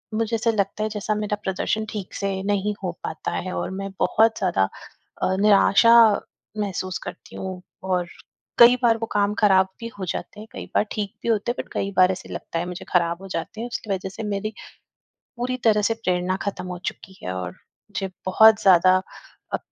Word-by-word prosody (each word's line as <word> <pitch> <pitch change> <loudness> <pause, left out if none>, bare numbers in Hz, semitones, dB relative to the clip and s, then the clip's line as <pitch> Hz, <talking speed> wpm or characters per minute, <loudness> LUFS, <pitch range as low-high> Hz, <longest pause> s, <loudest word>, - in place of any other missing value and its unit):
मुझे 225 +1 0
ऐसा 225 +1 +1
लगता 205 0 -1
है, 215 - 0
जैसा 210 0 -2
मेरा 210 0 -2
प्रदर्शन 215 +3 -1
ठीक 200 -4 -6
से 200 - -2 0.2
नहीं 205 0 0
हो 180 - -1
पाता 160 - -4
है 185 0 -3
और - - -2
मैं 195 0 -4
बहुत 225 +1 +3
ज़्यादा 175 - +2 0.6
अ, 185 - +2
निराशा 210 +2 +5 0.7
महसूस 185 -2 -2
करती - - -9
हूँ 185 -1 -5 0.2
और 180 -2 0 0.5
कई 240 +1 +9
बार 230 -1 +4
वो 225 - -3
काम 205 0 +2
खराब 190 -3 +5
भी 230 - -5
हो 185 - -3
जाते 205 +4 -5
हैं, 215 - -9
कई - - -7
बार - - +4
ठीक 205 -1 -3
भी 235 - -1
होते 220 +1 +1
हैं, - - -5
बट - - -25
कई 195 - -2
बार 185 0 +6
ऐसे 185 - -7
लगता 165 - -4
है 175 - -2
मुझे, 180 0 -7
ख़राब 170 0 +2
हो 195 - -8
जाते 190 +6 -4
हैं, 240 - -3
उसकी 215 -3 -5
वज़ह 190 0 -3
से 220 +4 -7
मेरी 210 +1 -3 0.8
पूरी 255 +1 -2
तरह 210 -1 +4
से - - 0
प्रेरणा 180 +1 0
ख़त्म 200 -2 -4
हो 180 -1 -5
चुकी 190 0 -16
है 90 - -3
और 90 -1 -4
मुझे 195 - -8 0.2
बहुत 220 +3 +6
ज़्यादा 185 0 +6 0.5
अ, - - +2
200 Hz, 200 wpm, -23 LUFS, 185-215 Hz, 0.8 s, कई